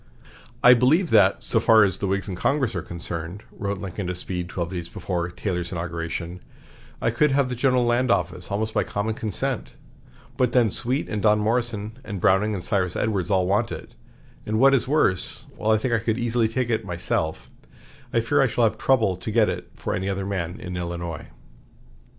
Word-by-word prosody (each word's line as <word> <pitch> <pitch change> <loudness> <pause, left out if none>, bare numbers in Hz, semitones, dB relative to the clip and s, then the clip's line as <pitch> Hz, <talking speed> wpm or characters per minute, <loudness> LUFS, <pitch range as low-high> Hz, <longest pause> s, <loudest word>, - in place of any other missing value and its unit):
"I 125 - +9
believe 145 +9 +3
that, 100 -3 +4
so 115 - +2
far 110 -1 +6
as 95 -3 +1
the 100 - -1
Whigs 95 +1 -1
in 95 - -4
Congress 135 +6 0
are 90 - -2
concerned," 85 +3 -4
wrote 100 -1 -3
Lincoln 95 0 -5
to 90 - -2
Speed 90 0 -4
twelve 85 -1 -3
days 85 -2 -5
before 90 -1 -3
Taylor's 90 -1 -3
inauguration, 85 0 -4 0.6
"I 115 - +1
could 150 +6 +3
have 135 -1 +2
the 125 - -3
General 125 0 +2
Land 120 +2 +2
Office - - 0
almost 110 +2 -2
by - - +2
common 105 +2 -2
consent; 110 -4 -3 0.6
but 125 -2 +1
then 120 -5 +4
Sweet 130 +6 -1
and 105 -2 -3
Don 105 0 +4
Morrison 110 0 -1
and 105 -5 -5
Browning 100 +4 +3
and 90 - -4
Cyrus 95 -3 0
Edwards 100 -5 -1
all 95 -2 +2
want 100 +3 +1
it, - - -8 0.5
and 110 +1 -1
what 135 +3 +6
is 135 - +2
worse, 130 - 0
while 110 - -2
I 110 - +5
think 120 +3 -1
I 115 - +3
could 115 0 -1
easily 120 -1 +1
take 120 +1 -1
it 110 - 0
myself, 85 -3 -3 0.6
I 115 - +2
fear 130 +6 +2
I 135 - +4
shall 120 0 0
have 110 0 +1
trouble 110 -6 +2
to - - -6
get - - +3
it - - -5
for - - -3
any 95 +2 -2
other 95 0 -2
man 95 -1 -3
in 90 -4 -6
Illinois." 85 -3 -5
105 Hz, 200 wpm, -24 LUFS, 90-120 Hz, 0.6 s, I